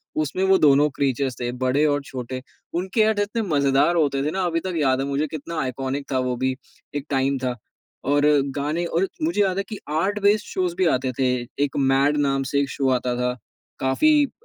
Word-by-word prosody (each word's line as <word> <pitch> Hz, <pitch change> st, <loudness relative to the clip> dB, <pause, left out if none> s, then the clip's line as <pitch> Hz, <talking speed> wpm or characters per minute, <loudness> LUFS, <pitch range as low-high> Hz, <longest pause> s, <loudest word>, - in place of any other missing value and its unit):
उसमें 155 Hz, +4 st, -1 dB
वो 190 Hz, 0 st, +5 dB
दोनों 145 Hz, -2 st, +5 dB
क्रीचर्स 135 Hz, -2 st, -1 dB
थे 120 Hz, -1 st, -2 dB
बड़े 135 Hz, +4 st, +2 dB
और 145 Hz, -1 st, +1 dB
छोटे। 130 Hz, -1 st, -6 dB, 0.3 s
उनके 190 Hz, +6 st, 0 dB
ऐड 215 Hz, -1 st, +3 dB
इतने 205 Hz, +3 st, -1 dB
मज़ेदार 140 Hz, -3 st, +2 dB
होते 140 Hz, -4 st, +1 dB
थे 150 Hz, -, 0 dB
ना 190 Hz, +2 st, -1 dB
अभी 165 Hz, -1 st, 0 dB
तक 185 Hz, +2 st, -4 dB
याद 135 Hz, -4 st, +2 dB
है -, -, -1 dB
मुझे 140 Hz, +2 st, -1 dB
कितना 160 Hz, +2 st, -5 dB
आइकॉनिक 135 Hz, +2 st, -3 dB
था 130 Hz, -, +1 dB
वो 125 Hz, -1 st, -1 dB
भी, 130 Hz, +1 st, -1 dB, 0.4 s
एक 145 Hz, -1 st, -3 dB
टाइम 135 Hz, 0 st, +1 dB
था। 125 Hz, -1 st, -2 dB, 0.5 s
और 145 Hz, +1 st, +3 dB, 0.3 s
गाने 150 Hz, +4 st, -1 dB
और 170 Hz, +3 st, 0 dB
मुझे 170 Hz, +6 st, +1 dB
याद 190 Hz, -2 st, +1 dB
है 195 Hz, -, 0 dB
कि 215 Hz, -, -5 dB
आर्ट 190 Hz, +7 st, 0 dB
बेस्ड 205 Hz, +1 st, +3 dB
शोज़ 180 Hz, -2 st, -2 dB
भी 185 Hz, 0 st, +1 dB
आते 130 Hz, -3 st, +1 dB
थे, 130 Hz, -1 st, +2 dB, 0.3 s
एक 145 Hz, -1 st, -2 dB
मैड 135 Hz, +2 st, +3 dB
नाम 135 Hz, -2 st, +1 dB
से 140 Hz, -, +3 dB
एक 140 Hz, -, -2 dB
शो 135 Hz, -2 st, 0 dB
आता 125 Hz, -1 st, 0 dB
था 125 Hz, 0 st, -1 dB, 0.4 s
काफ़ी 295 Hz, -, +3 dB
अ, -, -, -10 dB
145 Hz, 210 wpm, -23 LUFS, 135-175 Hz, 0.5 s, वो